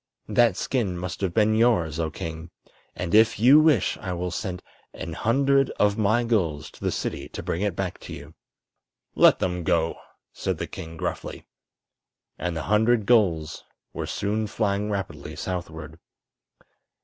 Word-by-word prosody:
That 120 -6 +3
skin 105 -9 -1
must 90 +2 -5
have 95 -3 0
been 110 +2 +3
yours, 110 -9 +2
oh 80 -1 0
king, 80 +2 -7 0.5
and 85 - -4
if 110 -1 +5
you 130 +7 +7
wish 155 - +3
I 95 -3 -4
will 90 0 -3
sent 90 0 -4 0.3
an 80 - -6
hundred 135 - +2
of 105 0 +3
my 110 +3 +2
gulls 85 -11 -1
to - - -17
the - - +1
city - - -4
to - - -7
bring 85 - -2
it 100 -4 0
back 95 -1 -3
to - - -9
you." 75 +3 -10 0.8
"Let - - +6
them 90 -1 -2
go!" 80 0 0 0.3
said - - -2
the - - -3
king, 80 0 -9
gruffly. - - -5 0.9
And 85 0 -2
the 80 - -3
hundred 110 +2 +2
gulls 90 -10 +2 0.3
were - - -4
soon 105 +2 -1
flying 105 -1 -1
rapidly 80 -7 -4
southward. 80 -2 -6
95 Hz, 160 wpm, -25 LUFS, 85-110 Hz, 0.9 s, you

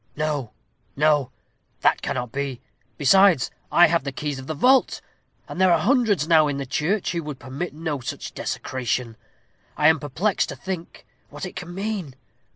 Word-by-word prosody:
No, 150 -6 -2 0.4
no; 145 -3 +2 0.5
that - - +3
cannot 125 -2 -3
be. 140 -2 -3 0.4
Besides, 180 0 +5 0.2
I 175 - +7
have 165 -2 +1
the 140 - -4
keys 145 +1 -4
of 130 - -10
the 155 - -3
vault; 260 - +3 0.5
and 185 - -5
there 185 -1 +5
are 170 - +5
hundreds 215 - +2
now 160 -2 +5
in 145 -1 -2
the 140 - -4
church 165 +10 -1
who 170 - -2
would 150 -3 -6
permit 135 +7 -6
no 155 -3 -3
such 120 - -6
desecration. 125 -2 -3 0.6
I 150 - +5
am 160 -1 +3
perplexed 165 +8 -1
to - - -5
think 185 -3 -7 0.2
what - - -7
it 180 - -8
can 175 0 -7
mean. 195 -8 -4
155 Hz, 170 wpm, -23 LUFS, 140-180 Hz, 0.6 s, I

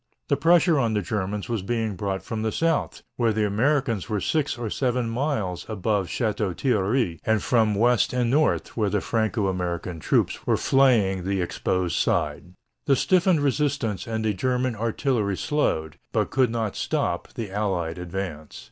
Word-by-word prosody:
The - - +4
pressure 165 +2 +4
on 115 -4 +1
the 105 - 0
Germans 100 +1 -3
was 115 -4 -2
being 110 0 -2
brought 95 +1 -3
from 110 -1 -4
the 110 0 0
south, 165 +2 -1
where 115 -2 +2
the 110 0 +1
Americans 115 +1 0
were 105 -2 0
six 145 - 0
or 120 -1 -3
seven 125 -2 0
miles 115 - -2
above 105 -2 0
Château 105 -5 -1
Thierry, 110 - +1
and 110 -2 +1
from 110 -3 +3
the 100 - -2
west 120 0 +3
and 125 -2 0
north, 150 +3 +1
where 105 -3 +1
the 105 - +1
Franco 110 0 0
American 90 -2 -3
troops - - 0
were - - +3
flaying 110 -9 +3
the 95 +1 -1
exposed 90 0 -1
side. 90 +1 -1 0.3
The 140 - +5
stiffened 180 +3 +3
resistance 135 - 0
and 110 -1 -2
the 105 - +1
German 125 +4 0
artillery 110 -2 -1
slowed, 80 - -1
but - - 0
could 130 -3 +3
not 115 -3 -2
stop, - - -2
the 110 -4 -5
Allied 90 -5 -2
advance. 85 -4 -6
110 Hz, 170 wpm, -25 LUFS, 95-125 Hz, 0.3 s, The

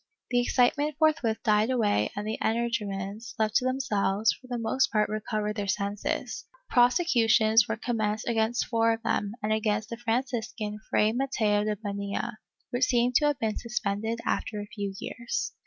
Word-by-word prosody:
The 245 -1 +3
excitement 275 +5 +2
forthwith 305 -8 +2
died 215 +1 +3
away 210 - +2
and 205 - -4
the 220 - -3
energumens, 215 -2 -2
left 215 -1 0
to 255 - 0
themselves, 220 -5 +1
for 255 - -16
the 245 -1 -3
most 230 +3 +1
part 210 -1 +2
recovered 215 0 -2
their 205 -1 -2
senses. 200 +1 -2 0.3
Prosecutions 235 - +4
were 220 - -2
commenced 220 -2 -2
against 230 0 +1
four 230 -1 +2
of 225 +1 -6
them 205 -2 0
and 215 +1 +1
against 215 0 0
the 230 - -4
Franciscan 235 -3 -2
Fray 210 +1 +3
Mateo 220 -5 +1
de 215 0 0
Bonilla, 200 +2 -4 0.3
which 245 +1 +2
seem 245 0 +2
to 300 - +2
have 295 -2 +1
been 220 -2 -1
suspended 220 -1 -2
after 220 -4 -1
a 205 - -5
few 205 -1 -5
years. 245 - -3
220 Hz, 165 wpm, -28 LUFS, 210-240 Hz, 0.3 s, Prosecutions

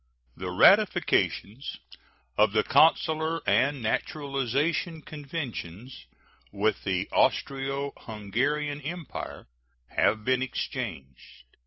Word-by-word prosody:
The 90 0 -5
ratifications 135 - +3 0.6
of 105 -1 +4
the 110 -1 +3
consular 160 0 +3
and 140 -2 +2
naturalization 145 +6 -1
conventions 135 - -7 0.4
with 105 +2 0
the 95 -1 0
Austro 135 +1 0
Hungarian 140 +8 -2
Empire 165 +3 -6 0.4
have 110 -1 +1
been 130 0 +2
exchanged. 65 - -5
135 Hz, 80 wpm, -27 LUFS, 110-150 Hz, 0.6 s, of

